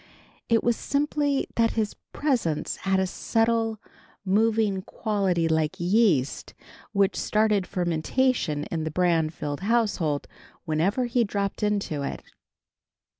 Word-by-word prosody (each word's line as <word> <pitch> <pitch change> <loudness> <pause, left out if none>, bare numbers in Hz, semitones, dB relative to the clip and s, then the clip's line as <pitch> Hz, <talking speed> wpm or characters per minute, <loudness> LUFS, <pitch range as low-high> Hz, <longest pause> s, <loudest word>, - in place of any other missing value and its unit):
It 230 -1 +3
was 240 -1 +2
simply 285 +1 0
that 230 -1 +3
his 215 -2 -1 0.2
presence 240 - -1
had 195 0 0
a 190 - +2
subtle, 225 +3 0 0.5
moving 210 0 +2
quality 190 -5 0
like 160 +3 0
yeast, 175 - +1 0.4
which 200 -2 +2
started 210 -3 +1
fermentation 175 - 0
in 160 -2 -1
the 160 - -2
Branfield 160 -3 0
household 200 -9 0 0.4
whenever 185 +11 +1
he 240 0 +2
dropped 200 -2 -2
into 205 -8 -1
it. 140 - -4
200 Hz, 115 wpm, -26 LUFS, 165-225 Hz, 0.5 s, It